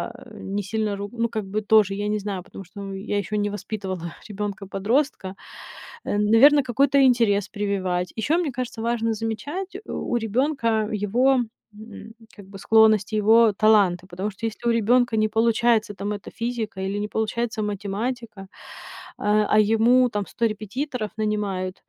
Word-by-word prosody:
э, - - -13
не 200 +1 -4
сильно 215 +1 -2
руг 200 0 -6
ну, 235 0 -1
как 215 -2 -4
бы 205 +3 -3
тоже, 210 -2 +4
я 205 +1 -3
не 210 0 0
знаю, 200 -2 -4
потому 195 - -11
что, 200 +3 -11
ну, 195 0 -6
я 205 +1 -3
ещё 210 +1 -4
не 205 0 0
воспитывала 190 -4 -5 0.2
ребёнка-подростка. 205 +2 -2 0.7
Э, 205 - -1
наверно, 245 +8 +6
какой-то 270 +3 +2
интерес 230 -6 +3
прививать. 190 -3 -2
Ещё, 305 +10 +1
мне 325 -6 -1
кажется, 245 -2 -5
важно 230 -1 0
замечать 285 - -4
у - - -3
у - - +3
ребёнка 230 -1 0 0.2
его, 250 +6 +3 0.4
м, 220 +1 -11 0.2
как 205 - -13
бы, 195 0 -11
склонность, 220 0 +4
его 220 +2 +5
таланты. 200 -4 +3
Потому 190 +3 -4
что 225 +4 -4
если 235 +2 -3
у - - +4
ребёнка 240 +1 +2
не 215 - +3
получается 225 -1 +2
там 205 +1 -4
эта 200 -3 -8
физика 230 -4 -4
или 195 +2 -2
не 210 - -2
получается 220 +1 -2
математика, 210 +2 -4 0.8
а 210 +1 +2
а 215 - +4
ему 230 +4 +4
там 205 -3 -3
100 235 - -2
репетиторов 220 +3 -4
нанимают, 205 -4 -2
215 Hz, 165 wpm, -23 LUFS, 200-235 Hz, 0.8 s, наверно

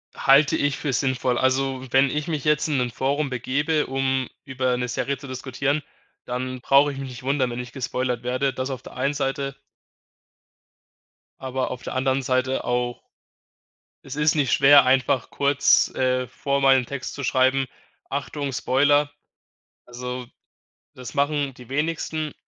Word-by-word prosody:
Halte 140 +2 +5
ich 145 -1 0
für 140 -3 -2
sinnvoll. 125 -2 0
Also, 130 0 0
wenn 135 +1 +4
ich 150 +2 -3
mich 155 -4 -2
jetzt 150 0 +2
in 145 - +1
'nem 125 -1 0
Forum 140 +4 -1
begebe 145 +5 0
um, 135 -1 -1 0.2
über 130 -2 0
'ne 125 0 -2
Serie 135 +3 -2
zu 140 +1 -11
diskutieren, 135 +3 -2 0.4
dann 125 0 -4
brauche 140 +2 +4
ich - - -9
mich 135 -1 -5
nicht 125 0 -10
wundern, 135 -2 +1
wenn 120 - -5
ich 125 -1 -7
gespoilert 125 -2 -2
werde, 130 +2 0
das 130 +1 -3
auf 130 -2 -5
der - - -12
einen 135 +3 0
Seite. 135 0 -2 1.8
Aber 130 0 -2
auf 125 - -7
der - - -5
anderen 130 +1 0
Seite 130 0 0
auch 125 0 -1 1.0
es 150 +3 +1
nicht 145 -3 +1
schwer 140 -1 +7
einfach 130 0 +2
kurz, 140 0 +3
äh, 130 -1 +1
vorher 140 +2 -2
mal 135 0 +6
'n 125 - -1
Text 135 0 -6
zu 140 - -6
schreiben, 130 +1 +2 0.5
„Achtung 140 0 -3
Spoiler.“ 145 +3 +2 0.7
Also, 125 +1 -6 0.7
das 125 -1 -9
machen 145 -1 0
die 125 -2 -14
wenigsten 155 +1 -2
135 Hz, 160 wpm, -24 LUFS, 130-140 Hz, 1.8 s, schwer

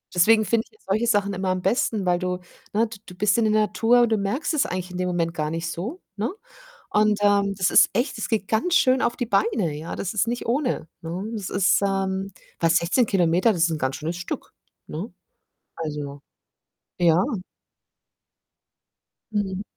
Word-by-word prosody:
Deswegen 220 +4 +5
finde 230 +1 +1
ich - - -31
ja 440 - -24
solche 215 +5 +1
Sachen 200 -3 +2
immer 190 0 -2
am 185 0 0
besten, 205 0 0
weil 175 -1 +2
du 180 0 -2 0.3
ne, 225 +2 +2
d 220 -1 -10
du 180 - -11
bist 200 +2 +2
in 230 - +3
der - - +2
Natur 235 +3 +3
und 235 - +3
du 220 - +2
merkst 205 +12 -1
es 300 - +2
eigentlich 180 0 -4
in 180 - -6
dem 180 0 -1
Moment 170 -2 -1
gar 155 -1 -2
nicht 165 0 -3
so, 235 - -5
ne? 215 - -2 0.6
Und, 210 0 +3
ähm, 200 -1 +3
das 185 -2 +2
ist - - +6
echt 240 +8 -1
das - - -4
geht 220 -4 -1
ganz 340 +11 +1
schön 260 -4 +4
auf 235 0 +1
die 245 - -2
Beine, 200 -6 +1
ja, 160 +2 -6
das 195 +3 -4
ist 215 - +2
nicht 240 +1 -3
ohne, 245 - -1
ne? 175 +4 -4
Das 205 -4 -4
ist 195 0 +3
ähm, 195 0 -1 0.3
fast 165 +2 +4
16 200 +8 +2
Kilometer, 180 +3 +3
das 170 -3 +2
ist 170 - +1
'n 155 - -2
ganz 130 -1 -1
schönes 165 +3 -4
Stück, 180 - -6 0.3
ne? - - -6 0.6
Also, 145 -3 -5 0.8
ja. 175 +1 +4 2.1
Mhm. 200 -2 -2
195 Hz, 195 wpm, -24 LUFS, 175-225 Hz, 2.1 s, ist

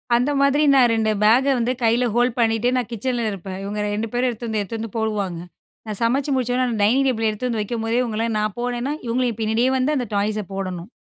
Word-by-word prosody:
அந்த 250 +5 +2
மாதிரி 280 +2 +3
நான் 250 -3 +5
2 220 -1 +1
பேக 230 +5 +5
வந்து 240 +2 0
கையில 235 +2 +3
ஹோல்ட் 245 0 +2
பண்ணிட்டு, 225 +1 +2
நான் 245 -2 -2
கிச்சன்ல 235 +1 -2
இருப்பேன். 190 -1 -7
இவங்க 205 +1 -4 0.2
2 225 +2 -2
பேரும் 250 +1 +1
எடுத்து 235 0 -5
வந்து 220 -2 -1
எடுத்து 215 +3 -5
வந்து 220 -2 -6
போடுவாங்க. 205 -6 -2 0.5
நான் 210 -2 -2
சமைச்சி 270 +5 +1
முடிச்சவுடனே 255 0 +1
அந்த 230 -3 -2
டைனிங் 255 +7 +3
டேபிள் 225 -4 +1
எடுத்துட்டு 215 +4 -3
வந்து 225 -2 -1
வைக்கும்போதே, 225 +2 -1
இவங்கள 225 -1 -2
நான் 215 -1 -2
போனேன்னா, 245 +3 -2
இவங்களையும் 235 -1 -1
பின்னாடியே 220 +3 +2
வந்து 285 +4 +1
அந்த 250 - -1
டாய்ஸை 210 +1 0
போடணும். 185 -1 -5
230 Hz, 205 wpm, -22 LUFS, 215-250 Hz, 0.5 s, நான்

